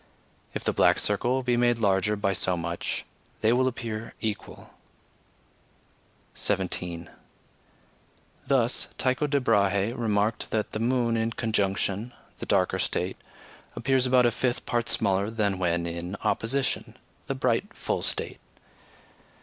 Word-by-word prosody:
If - - -3
the - - 0
black - - +4
circle 125 +6 +1
be 125 -1 +2
made 120 0 +3
larger 100 -1 +2
by 100 -1 0
so 90 -1 +1
much, 85 +1 -3 0.4
they 110 +2 +4
will 130 +1 +3
appear 115 -3 -4
equal. 110 -3 -5 1.6
17. 90 -3 -2 1.4
Thus 125 -3 +2
Tycho 130 +3 +1
de 145 -1 +2
Brahe 100 -3 +2
remarked 110 -2 0
that 110 -1 -1
the 110 - -3
moon 120 0 +1
in 115 0 0
conjunction 105 0 -1 0.3
(the - - -6
darker - - +2
state) 90 +2 -1 0.6
appears 130 +1 +2
about 125 -1 +5
a 120 - +4
fifth 125 +1 -1
part 120 -1 0
smaller 100 -1 +2
than 105 -4 0
when 85 -1 +1
in 85 +2 -4
opposition 135 +4 0 0.3
(the - - -1
bright - - 0
full - - -2
state). - - -1
110 Hz, 130 wpm, -27 LUFS, 100-120 Hz, 1.6 s, about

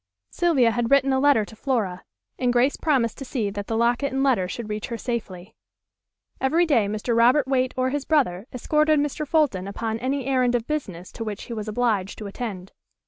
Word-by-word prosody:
Sylvia 285 -10 +3
had 235 0 -1
written 275 -1 +4
a 265 - +2
letter 270 -6 +4
to 220 - -13
Flora, 215 -8 -2 0.4
and 250 -1 +2
Grace 250 +3 +2
promised 260 -8 0
to - - -5
see 235 -6 -2
that 205 0 -6
the 225 - -1
locket 240 +4 +1
and 270 +1 0
letter 240 -10 +2
should 230 +4 -6
reach 210 0 -4
her 235 - -4
safely. 210 -6 -5 0.9
Every 325 +6 +2
day 245 -10 +2
Mr. 215 +3 -2
Robert 250 +5 +4
Waite 260 -1 0
or 255 0 +1
his 290 0 -2
brother 240 - +1
escorted 305 +4 +2
Mr. 295 +1 -2
Fulton 270 - +1
upon 220 +2 -3
any 265 +2 -2
errand 255 -2 +2
of 235 -2 -1
business 195 - -4
to 230 - -6
which 210 -2 -5
he 240 - -7
was 215 -1 -5
obliged 215 -4 -1
to 215 - -7
attend. 200 -3 -6
240 Hz, 200 wpm, -24 LUFS, 215-270 Hz, 0.9 s, written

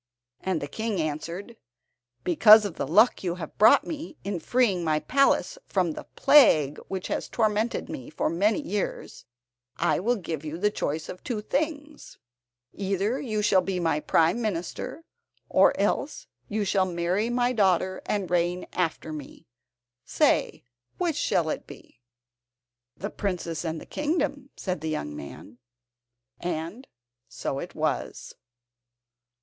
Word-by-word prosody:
And 185 -4 -1
the - - -3
King 220 +4 -3
answered: 165 +8 -4 0.7
"Because 210 +5 +7
of 200 - -3
the - - -4
luck 210 - +4
you 175 -2 -1
have 180 - -8
brought 215 - +7
me, 315 0 -6
in 200 -3 -3
freeing 200 -1 +1
my 155 -2 +1
palace 275 - +2
from 180 -4 +1
the - - -8
plague 165 - +5
which 190 -1 -4
has - - -2
tormented 220 +1 0
me 130 - -7
for 155 - -1
many 200 - +2
years, 210 -9 -4 0.5
I 175 - +1
will 235 +7 +1
give 165 -7 -5
you 155 +1 -5
the 210 +4 +1
choice 155 -4 -3
of 180 - -9
two 235 -4 -3
things. 295 +5 -3 0.6
Either 200 +5 -1
you 215 -5 -2
shall 190 -2 +4
be 190 -1 -2
my 165 -3 +1
Prime 165 +8 +2
Minister, 210 - -4 0.5
or - - +4
else - - -1 0.2
you 210 0 -1
shall 190 -1 +2
marry 175 +6 0
my 245 +1 +1
daughter 185 -3 +2
and 200 -3 -1
reign 175 +1 +1
after 160 -3 -2
me. 150 -3 -9 0.6
Say, - - +1 0.3
which 345 -4 0
shall - - +1
it - - -4
be?" - - -14 1.0
"The 205 +2 -5
princess 175 -5 -3
and 160 -1 -3
the - - -11
kingdom," 295 -3 -2
said 185 -5 -3
the 160 - -3
young 75 - -3
man. 105 +11 -10 0.8
And 175 +9 -4 0.4
so - - -4
it - - -7
was. - - -2
190 Hz, 145 wpm, -26 LUFS, 165-225 Hz, 1.0 s, Because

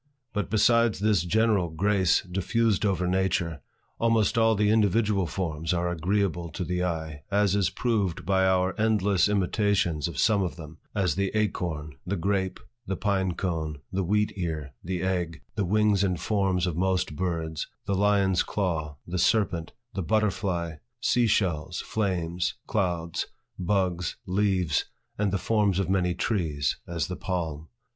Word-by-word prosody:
But 105 -1 -2
besides 115 +1 +4
this 105 -3 +2
general 105 0 +2
grace 95 +2 +2
diffused 105 +3 +1
over 95 -2 0
nature, 90 -4 0 0.4
almost 115 -2 +2
all 115 -1 +4
the 105 0 +3
individual 105 -3 +2
forms 80 -1 -2
are 85 0 0
agreeable 90 0 0
to - - -3
the 90 0 -1
eye, 80 -4 -3
as 100 -1 +2
is 95 -3 +2
proved 100 -11 -1
by 95 0 +3
our 95 0 +2
endless 105 -4 +3
imitations 100 -5 +1
of 85 -5 -7
some 105 -2 +3
of 90 -4 -2
them, 80 -1 -10 0.2
as 95 -6 +2
the 100 +2 0
acorn, 85 -8 -2
the 95 +3 -2
grape, 95 +1 -1 0.3
the 95 - -1
pine 95 -2 0
cone, 80 -5 -2
the 95 +1 0
wheat 105 +4 +1
ear, 80 -7 -4
the 90 0 -3
egg, 90 -3 -2
the 105 -3 -1
wings 105 +1 +3
and 90 -3 0
forms 95 -4 +1
of 90 -4 -2
most 90 -3 0
birds, 80 -3 -2 0.2
the 100 - -1
lion's 100 -2 +3
claw, 80 -7 -2
the 90 +1 -3
serpent, 90 -5 +1 0.2
the 95 - -2
butterfly, 95 -5 0 0.2
sea 120 0 +2
shells, 90 -5 0
flames, 90 -3 -1
clouds, 85 -5 -1 0.3
buds, 90 -2 0
leaves, 95 -5 +1 0.3
and 105 -2 +1
the 100 - +1
forms 105 -2 +1
of 95 -2 0
many 90 -2 +1
trees, 80 -8 0
as 85 -4 -1
the - - -4
palm. 80 -4 -3
95 Hz, 150 wpm, -27 LUFS, 85-105 Hz, 0.4 s, besides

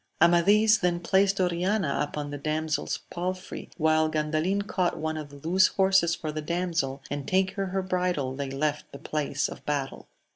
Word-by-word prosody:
Amadis 205 +6 +5
then 175 -1 +1
placed 195 +2 +2
Oriana 180 -2 0
upon 145 0 -3
the 145 - -4
damsel's 155 +1 -2
pal 180 +2 -2
frey, 185 - -9
while 155 -1 +3
Gandalin 155 +6 0
caught 185 -3 0
one 160 0 -2
of 155 -2 -6
the 145 +2 -10
loose 185 +2 +5
horses 190 -3 +3
for 155 -2 -5
the 155 0 -4
damsel, 165 -5 -2
and 145 -1 -4
taking 190 +1 +1
her 190 0 -2
bridle 180 -8 -1
they 140 0 -4
left 150 +2 -2
the - - -8
place 145 -1 -2
of - - -10
battle. 140 -2 -3
170 Hz, 175 wpm, -27 LUFS, 150-185 Hz, -, Amadis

